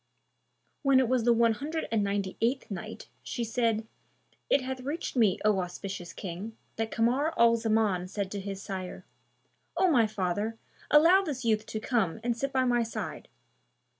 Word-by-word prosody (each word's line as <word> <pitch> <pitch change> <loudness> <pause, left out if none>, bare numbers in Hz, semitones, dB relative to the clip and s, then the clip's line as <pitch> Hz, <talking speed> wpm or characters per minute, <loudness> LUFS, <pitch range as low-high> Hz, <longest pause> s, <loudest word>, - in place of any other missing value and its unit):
When 275 -2 +5
it 260 - +3
was 250 -1 +1
the 240 - +5
One 230 -1 +4
Hundred 310 +8 -4
and 220 -2 +2
Ninety 200 -1 -1
eighth 245 +1 0
Night, 190 - -6
She 240 - -4
said, 225 -1 0 0.6
It 280 - +4
hath 260 0 -4
reached 290 +5 -4
me, 220 -7 +4
O 210 -2 +4
auspicious 180 0 -5
King, 195 +5 -7 0.2
that 225 0 -1
Kamar 255 +9 +1
al 230 0 +6
Zaman 220 -5 +1
said 195 0 -4
to 205 - -3
his 195 0 -6
sire, 185 -2 -6 0.7
"O 370 - +4
my 235 -6 +4
father, 210 +2 -2 0.3
allow 330 +6 +7
this 280 -9 -4
youth 215 -1 +1
to 215 - -4
come 220 -5 0
and 240 0 0
sit 275 +3 -2
by 260 -1 +2
my 240 -1 +3
side." 230 0 -5
225 Hz, 170 wpm, -29 LUFS, 200-255 Hz, 0.7 s, allow